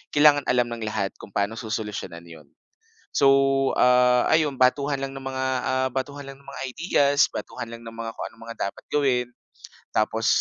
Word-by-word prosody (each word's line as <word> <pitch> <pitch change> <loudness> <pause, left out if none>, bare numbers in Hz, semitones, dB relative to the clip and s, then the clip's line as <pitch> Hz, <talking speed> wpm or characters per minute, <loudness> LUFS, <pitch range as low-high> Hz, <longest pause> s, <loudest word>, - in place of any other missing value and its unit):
kailangan 145 -1 +6
alam 120 -1 +2
ng 115 -2 -4
lahat 100 -2 -1
kung - - -10
paano 100 +2 0
susolusyunan 105 -6 -5
'yon. 80 -4 -13 0.7
So, 140 - +4 0.5
ah, 125 0 +5
ayun, 155 -3 +3
batuhan 140 +3 +3
lang 135 0 -4
ng 135 - -8
mga, 130 0 -2 0.2
ah, 130 0 +1
batuhan 140 +2 -4
lang 135 - -15
ng 140 - -23
mga 140 - -8
ideas, 145 -3 +3
batuhan 120 -2 -6
lang 115 0 -9
ng 115 - -8
mga 115 0 -5
kung - - -5
anong 115 0 -15
mga 115 - -6
dapat - - -16
gawin, 130 -4 +2 0.7
tapos 110 +1 +1
125 Hz, 180 wpm, -24 LUFS, 115-140 Hz, 0.7 s, kailangan